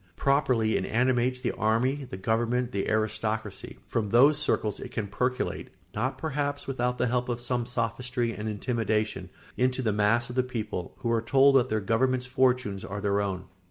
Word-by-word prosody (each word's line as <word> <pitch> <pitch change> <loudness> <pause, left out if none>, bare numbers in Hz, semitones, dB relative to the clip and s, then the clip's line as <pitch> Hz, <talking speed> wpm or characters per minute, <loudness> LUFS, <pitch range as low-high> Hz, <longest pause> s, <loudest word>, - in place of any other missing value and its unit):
Properly 125 -6 +2
it 95 - -2
animates 125 +1 +1
the - - 0
army, 125 +6 0
the 95 - -6
government, 120 +5 0
the 100 -4 -2
aristocracy; 110 -1 -2
from 110 -3 -2
those 140 +7 +5
circles 110 -8 0
it - - -7
can 110 - -3
percolate, 125 +6 -2 0.2
not 130 +5 -2
perhaps 145 -2 -2
without 125 -2 -1
the 125 - +1
help 125 +1 0
of 120 -1 -1
some 120 -1 -2
sophistry 120 0 -2
and 110 0 -4
intimidation, 110 -3 -1 0.3
into 130 +1 +1
the 110 -3 +1
mass 105 +3 +2
of - - -8
the 130 - +4
people, 115 -8 -5
who 115 - 0
are 115 -1 +2
told 135 +4 +5
that 130 -1 +4
their 110 0 0
government's 125 +5 +1
fortunes 125 -6 +1
are 100 +2 -5
their 100 0 +1
own. 95 -2 -3
120 Hz, 180 wpm, -27 LUFS, 110-125 Hz, 0.3 s, those